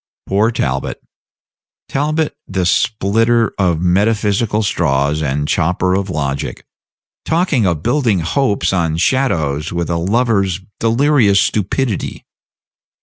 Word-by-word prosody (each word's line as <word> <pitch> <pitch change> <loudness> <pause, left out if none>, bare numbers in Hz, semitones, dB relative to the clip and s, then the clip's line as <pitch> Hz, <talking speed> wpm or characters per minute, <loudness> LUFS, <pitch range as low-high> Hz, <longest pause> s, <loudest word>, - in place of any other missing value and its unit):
Poor 105 +3 +2
Talbot! 70 - -2 0.9
Talbot, 150 +2 -1
the 95 -2 -1
splitter 115 +4 +1
of 85 -4 +1
metaphysical 105 +3 +1
straws 75 -5 0
and 75 0 -1
chopper 90 +3 +1
of 95 +1 -1
logic, 70 -4 -3 0.6
talking 160 - +1
of 85 -3 -1
building 120 - +1
hopes 100 - 0
on 80 -3 0
shadows 80 - 0
with 85 0 -2
a 85 - 0
lover's 100 -1 +1 0.2
delirious 115 -3 +3
stupidity. 105 +3 -1
100 Hz, 105 wpm, -16 LUFS, 85-115 Hz, 0.9 s, delirious